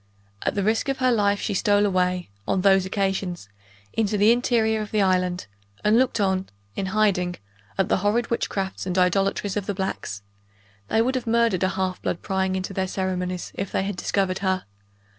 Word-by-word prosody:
At - - -1
the 200 - 0
risk 225 +6 +1
of 270 - 0
her 255 -1 +3
life 205 -3 +2
she 205 - -2
stole 205 +1 +3
away, 180 - 0 0.2
on 190 - +1
those 195 -1 +4
occasions, 190 - -2 0.4
into 210 -1 +1
the 210 +3 +6
interior 230 -3 +2
of 210 - -5
the 210 -2 +2
island, 185 -1 +1 0.4
and 210 +1 +4
looked 250 -1 +2
on, 190 -1 0 0.3
in 195 - -2
hiding, 185 -3 +1 0.4
at 195 -1 +2
the - - +2
horrid 210 +5 0
witchcrafts 195 -5 -2
and 180 0 -1
idolatries 195 +2 +1
of 200 - -3
the 205 - -1
blacks; 140 - -4 0.6
they 225 - +3
would 255 +2 0
have 255 -2 -3
murdered 230 -5 +2
a 185 - +2
half 185 -1 -2
blood, 170 - -3
prying 190 -1 0
into 190 +1 -3
their 190 0 -1
ceremonies, 185 -1 -3
if 195 -1 -4
they - - 0
had 200 0 -3
discovered 185 0 0
her. 190 -1 0
195 Hz, 190 wpm, -24 LUFS, 185-210 Hz, 0.6 s, the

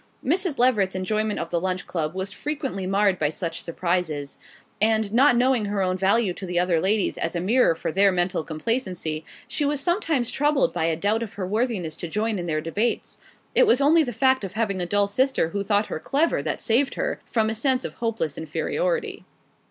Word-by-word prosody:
Mrs. 340 +1 +1
Leveret's 215 -7 +3
enjoyment 215 +3 -1
of 165 - -4
the 170 -1 0
Lunch 185 0 -2
Club 160 -1 -3
was 190 +1 -3
frequently 270 - -4
marred 195 -1 +2
by 150 - +2
such 165 +1 -3
surprises; 170 -5 -2 0.4
and 220 -1 +2
not 245 0 +5
knowing 250 -3 +2
her 200 -1 -1
own 185 0 0
value 195 +1 +2
to 190 - -7
the 175 0 -2
other 175 -2 +2
ladies 200 +3 +1
as 165 - -2
a - - 0
mirror 210 0 +3
for 160 - -3
their 195 +3 +4
mental 175 -1 0
complacency 165 -3 -2 0.2
she 300 - -1
was 290 0 0
sometimes 320 - 0
troubled 290 -1 +1
by 160 - 0
a 165 -1 +1
doubt 205 +6 0
of 220 -2 -5
her 195 - -3
worthiness 205 -6 -1
to 175 - -5
join 210 +4 -1
in 175 - -4
their 155 -1 -1
debates. 205 +9 -2 0.3
It - - +5
was 275 - +4
only 305 +4 +5
the 260 -6 -1
fact 260 +2 +2
of 190 - -5
having 200 -4 -1
a 175 - -2
dull 205 +2 +2
sister 255 -4 +1
who 200 +3 -3
thought 205 +1 +1
her - - -5
clever 290 - +1
that - - -3
saved 260 +4 +1
her, - - -2
from 220 -2 0
a - - -1
sense 255 +3 +1
of - - -5
hopeless 225 -10 -2
inferiority. 420 - -2
205 Hz, 205 wpm, -24 LUFS, 180-255 Hz, 0.4 s, not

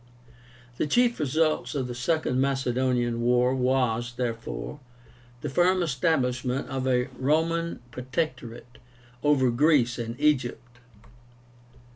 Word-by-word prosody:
The - - 0
chief 240 +7 +2
result 155 +2 0
of 135 -3 -1
the 125 - -5
second 130 0 0
Macedonian 125 -3 0
war 125 +1 +3
was, 125 -2 0
therefore, 120 +4 -4 0.6
the - - -3
firm 180 +5 +3
establishment 130 -4 0
of 130 -1 -2
a 125 -1 +1
ROMAN 165 +4 0
PROTECTORATE 125 -3 -5 0.4
OVER 140 -4 +3
GREECE 125 -2 +3
AND 115 +1 -5
EGYPT. 125 -4 0
130 Hz, 105 wpm, -26 LUFS, 125-150 Hz, 0.6 s, war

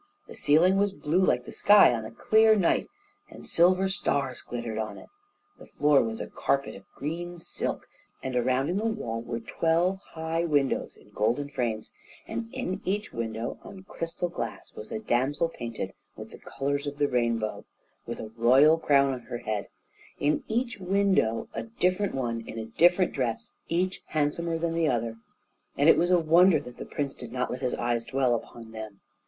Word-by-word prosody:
The - - -11
ceiling 170 +6 +4
was 200 0 +2
blue 175 +2 +1
like 125 -8 +2
the - - -9
sky 205 -10 +6
on 110 -2 -3
a - - -8
clear 220 - +4
night, 190 -5 +2 0.4
and - - -12
silver 185 +3 +4
stars 140 -9 -1
glittered 115 -2 -5
on 110 0 -4
it, - - -13 0.5
the - - -13
floor 145 -1 +3
was 110 -1 -3
a - - -3
carpet 140 0 -1
of 95 - -14
green 175 +4 -5
silk, 165 - -4 0.4
and 130 -1 -3
around 130 +3 +1
in 180 - 0
the 215 - -1
wall 120 - -2
were 115 0 -4
twelve 170 +10 +1 0.2
high 160 +1 -1
windows 145 -5 0
in - - -20
golden 125 +7 0
frames, 115 -6 -3 0.4
and 115 0 -4
in 185 +2 -3
each 205 +3 -2
window 115 0 -4
on 190 -1 -11
crystal 170 -1 -4
glass 120 -10 -6
was 105 - -10
a - - -2
damsel 135 +9 0
painted 115 -7 -6 0.2
with - - -10
the - - -11
colours 140 +1 -3
of 145 0 -5
the 145 0 +2
rainbow, 115 -4 -1 0.4
with 120 - -5
a 110 - -7
royal 135 +7 +5
crown 140 -3 +3
on 130 - -5
her 120 - -3
head, 105 -3 -3 0.5
in 145 +1 +1
each 235 +1 -1
window 190 - +1
a - - -3
different 200 - 0
one 120 -3 -2
in - - -7
a 110 - -4
different 175 +10 +3
dress, 115 -4 -2 0.2
each 180 +2 0
handsomer 160 +2 -1
than 165 0 -1
the 165 -1 +1
other, 115 -3 -1 0.6
and 145 - +3
it - - +8
was 175 - +2
a 180 - +5
wonder 170 +1 +5
that 125 -2 -11
the - - -7
prince 140 -2 -3
did 120 -2 -10
not 125 0 -2
let 125 - -5
his 125 -2 -1
eyes 120 -1 -1
dwell 130 0 +1
upon 115 -1 -6
them. 110 -2 -8
140 Hz, 190 wpm, -27 LUFS, 120-175 Hz, 0.6 s, it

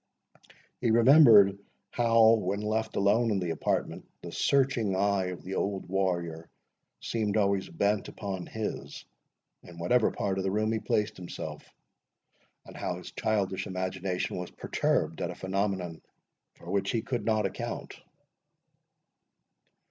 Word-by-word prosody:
He 120 - 0
remembered 115 -5 +7 0.3
how, 115 -1 +5
when 100 -2 -1
left 110 +1 -2
alone 110 +4 +3
in 100 -3 +1
the 90 -2 -2
apartment, 80 - -2
the - - -7
searching 130 -8 +1
eye 100 0 +1
of 90 -1 -6
the 95 - -6
old 100 0 -2
warrior 85 -4 -2 0.5
seemed 110 -2 -1
always 100 -2 +1
bent 100 +4 0
upon 95 -4 -5
his, 110 -1 -5 0.6
in 85 -1 -14
whatever 110 +8 +2
part 95 -1 -2
of - - -1
the 95 - 0
room 110 +2 0
he 110 - 0
placed 105 0 -1
himself, 90 -1 -8 0.9
and - - -13
how - - -3
his - - -10
childish 100 -3 -1
imagination 95 0 -3
was 90 0 -5
perturbed - - -1
at - - -1
a - - -6
phenomenon, 95 -3 -2 0.5
for 85 - -10
which 100 0 0
he 115 - -1
could 120 -5 -3
not 110 0 +1
account. - - -5
100 Hz, 140 wpm, -29 LUFS, 95-110 Hz, 0.9 s, remembered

